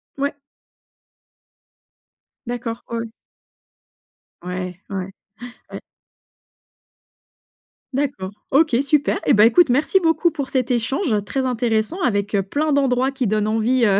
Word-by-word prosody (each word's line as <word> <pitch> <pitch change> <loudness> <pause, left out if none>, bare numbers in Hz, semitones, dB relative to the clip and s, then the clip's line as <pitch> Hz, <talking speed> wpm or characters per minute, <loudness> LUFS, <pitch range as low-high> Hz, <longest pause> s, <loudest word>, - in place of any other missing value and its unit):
Mouais. 280 +1 -2 2.1
D'accord 240 -1 -4
ouais, 230 0 -2
ouais. 230 - -4 1.4
Ouais, 180 0 -5
ouais, 200 - -5
ouais, 190 +1 -5 0.6
ouais. - - -6 2.1
D'accord, 260 -9 -2 0.2
OK, 295 -2 +4
super. 285 +1 +1
Et - - +4
bah, 210 +1 +6
écoute, 305 +5 +5
merci 290 +9 +3
beaucoup 330 +1 +3
pour 280 -4 -5
cet 255 -1 0
échange 240 - 0
très 260 +5 -2
intéressant 240 - 0
avec, 205 -3 0
heu, 195 - +2
plein 290 +9 -1
d'endroits 265 -1 +2
qui 260 -4 -2
donnent 215 0 +1
envie, 230 +3 +2
heu, 200 -1 +3
245 Hz, 125 wpm, -21 LUFS, 215-280 Hz, 2.1 s, bah